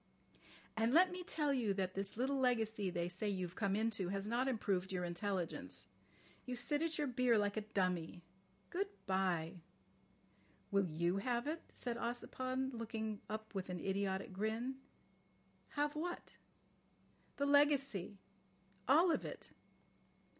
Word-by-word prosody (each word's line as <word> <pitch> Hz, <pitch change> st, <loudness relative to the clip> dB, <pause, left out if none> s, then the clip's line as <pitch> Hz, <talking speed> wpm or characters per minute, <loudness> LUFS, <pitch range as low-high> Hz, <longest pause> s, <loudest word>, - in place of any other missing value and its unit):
"And 225 Hz, +4 st, +2 dB
let 365 Hz, +2 st, +7 dB
me 360 Hz, 0 st, -4 dB
tell 300 Hz, -4 st, +1 dB
you 225 Hz, -7 st, +1 dB
that 185 Hz, -1 st, -1 dB
this 195 Hz, +1 st, -2 dB
little 270 Hz, +3 st, +1 dB
legacy 220 Hz, -6 st, +2 dB
they 175 Hz, -1 st, -1 dB
say 185 Hz, +4 st, -2 dB
you've 185 Hz, -3 st, -2 dB
come 200 Hz, -2 st, +1 dB
into 215 Hz, -4 st, 0 dB
has 195 Hz, +1 st, -2 dB
not 240 Hz, +4 st, +1 dB
improved 195 Hz, -7 st, 0 dB
your 180 Hz, -1 st, -1 dB
intelligence. 175 Hz, 0 st, -3 dB, 0.5 s
You 250 Hz, -, -3 dB
sit 290 Hz, +5 st, +1 dB
at 330 Hz, 0 st, 0 dB
your 300 Hz, -, +1 dB
beer 250 Hz, -3 st, +3 dB
like 205 Hz, -1 st, +1 dB
a 215 Hz, -, 0 dB
dummy. 185 Hz, -5 st, -1 dB, 0.5 s
Good 390 Hz, +3 st, 0 dB, 0.2 s
bye." 180 Hz, -3 st, 0 dB, 1.1 s
"Will 200 Hz, -2 st, +3 dB
you 170 Hz, +3 st, +1 dB
have 240 Hz, +4 st, 0 dB
it?" 320 Hz, +3 st, -2 dB
said 240 Hz, -1 st, -3 dB
Ossipon, 255 Hz, +2 st, -2 dB
looking 220 Hz, -2 st, -3 dB
up 220 Hz, +1 st, -5 dB
with 190 Hz, -2 st, -3 dB
an 180 Hz, -1 st, -3 dB
idiotic 190 Hz, +1 st, -1 dB
grin. 220 Hz, +6 st, -1 dB, 1.0 s
"Have 295 Hz, +1 st, +1 dB
what?" 350 Hz, +3 st, -4 dB, 1.0 s
"The 280 Hz, -, +1 dB
legacy. 275 Hz, -9 st, +3 dB, 0.7 s
All 325 Hz, +7 st, +6 dB
of -, -, +1 dB
it." -, -, -7 dB
220 Hz, 140 wpm, -38 LUFS, 190-260 Hz, 1.1 s, let